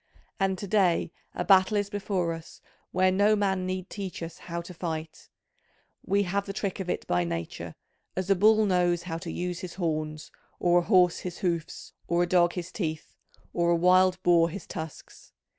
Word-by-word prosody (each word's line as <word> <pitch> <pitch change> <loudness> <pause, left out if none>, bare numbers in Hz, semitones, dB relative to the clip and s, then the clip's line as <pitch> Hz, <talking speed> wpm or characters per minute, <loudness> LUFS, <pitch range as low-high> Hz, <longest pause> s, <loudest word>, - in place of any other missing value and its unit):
And 190 -1 +1
to 200 - -5
day 185 -5 +2 0.2
a - - -2
battle 195 +2 +5
is 205 0 -1
before 195 -4 -1
us 165 0 -10 0.3
where 185 +1 +3
no 205 +3 +4
man 190 -3 0
need 185 0 -3
teach 195 -4 -6
us 165 0 -8
how 170 -1 -5
to 175 +2 -10
fight: 160 -2 -5 0.7
we 200 +1 +2
have 200 +2 -2
the 195 - -4
trick 195 -1 -3
of 185 -2 -4
it - - -2
by 90 0 +1
nature, 85 0 -5 0.4
as 185 0 -2
a 195 - +4
bull 215 +3 +5
knows 175 -3 +2
how 165 -2 -4
to 170 -1 -6
use 180 0 -3
his 185 -2 -7
horns, 155 -3 -3 0.3
or 175 0 +4
a 175 - -3
horse 180 -4 +4
his 180 - -6
hoofs, 170 -3 -3
or 170 +1 +2
a - - -1
dog 175 -1 +3
his 180 0 -5
teeth, 160 -6 -4 0.4
or 170 0 +1
a 170 - +4
wild 185 +2 +4
boar 170 -1 +5
his 195 +5 -7
tusks. 160 -1 -9
180 Hz, 195 wpm, -27 LUFS, 170-190 Hz, 0.7 s, battle